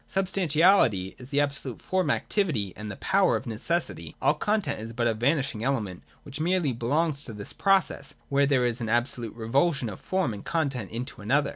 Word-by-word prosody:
Substantiality 175 - +3
is 125 0 -10
the 140 0 +1
absolute 140 -4 -2
form 185 -1 0
activity 130 - 0
and 105 +1 -7
the 100 - -5
power 195 - +2
of 110 - -3
necessity: 115 - -2
all - - +3
content 205 +6 -1
is 110 +1 -7
but 120 +1 -1
a 115 - +3
vanishing 125 -1 0
element 110 -9 -1 0.2
which 140 +2 -8
merely 170 -4 +1
belongs 145 +6 0
to 115 - -8
this 105 -1 -4
pro 195 -1 +4
cess, - - -7
where 140 0 +3
there 130 -3 +3
is 120 +1 0
an 115 - -2
absolute 120 -1 -1
revulsion 130 +3 +1
of 100 - -8
form 185 - -1
and 100 - -8
content 140 - -1
into 120 +3 -5
one 105 - -10
another. 140 +4 +3
135 Hz, 195 wpm, -27 LUFS, 115-165 Hz, 0.2 s, pro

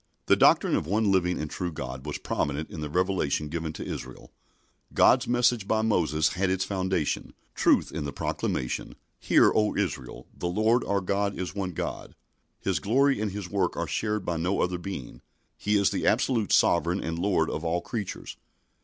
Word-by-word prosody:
The - - +5
doctrine - - +4
of - - -1
one 105 +2 +2
living 90 -2 +2
and 75 - -3
true 90 +3 -4
God 65 -2 -6
was 75 - -3
prominent 75 +2 -2
in 80 - -6
the 75 - -4
revelation 90 -4 0
given 80 0 -3
to - - -7
Israel. 65 0 -7 0.6
God's - - +5
message 120 -3 +2
by 110 0 +1
Moses 80 -8 +2
had 95 +1 -1
its 95 0 0
foundation 95 -5 -2 0.2
truth - - +3
in - - -4
the 70 - -4
proclamation: 60 -2 -3 0.2
"Hear, - - +4
O 105 -1 +2
Israel, 75 -11 -3
the 90 - -3
Lord 110 +7 +2
our 100 0 0
God 100 +2 -1
is 95 - -4
one 95 -4 -4
Lord." - - -5 0.4
His - - 0
glory 135 +3 +2
and 105 -2 -1
His 100 -2 -5
work 95 -2 -1
are - - -1
shared 105 -2 -2
by 85 -1 -1
no 90 +4 0
other 90 -1 -1
being. 85 -9 -7 0.3
He 105 0 +1
is 100 -1 +3
the - - -1
absolute 115 -7 +2
Sovereign 85 +4 +3
and 80 0 -3
Lord 90 -4 +1
of 80 - -4
all 85 +1 0
creatures. 105 -2 -5
95 Hz, 185 wpm, -27 LUFS, 80-100 Hz, 0.6 s, The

